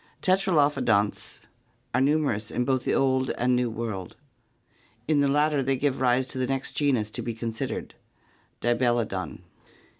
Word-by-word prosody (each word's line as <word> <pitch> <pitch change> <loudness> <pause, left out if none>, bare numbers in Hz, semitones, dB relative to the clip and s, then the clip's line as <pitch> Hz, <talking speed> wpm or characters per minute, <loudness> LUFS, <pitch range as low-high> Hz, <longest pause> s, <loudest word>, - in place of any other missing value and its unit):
Tetralophodonts 150 - +1 0.5
are 130 - +2
numerous 135 -7 +1
in 125 - -1
both 130 -1 0
the - - +1
Old 130 -1 +2
and 125 +1 +2
New 125 -1 +1
World. 110 -5 -5 0.9
In 155 -1 +3
the 140 - +3
latter 150 +1 +2
they 135 0 0
give 135 0 -1
rise 125 0 +3
to 130 - -4
the 130 - 0
next 135 0 -2
genus 125 -8 +1
to - - -4
be 115 -2 -4
considered, 115 -1 -4 0.7
Dibelodon. 120 -7 0
130 Hz, 145 wpm, -26 LUFS, 115-140 Hz, 0.9 s, In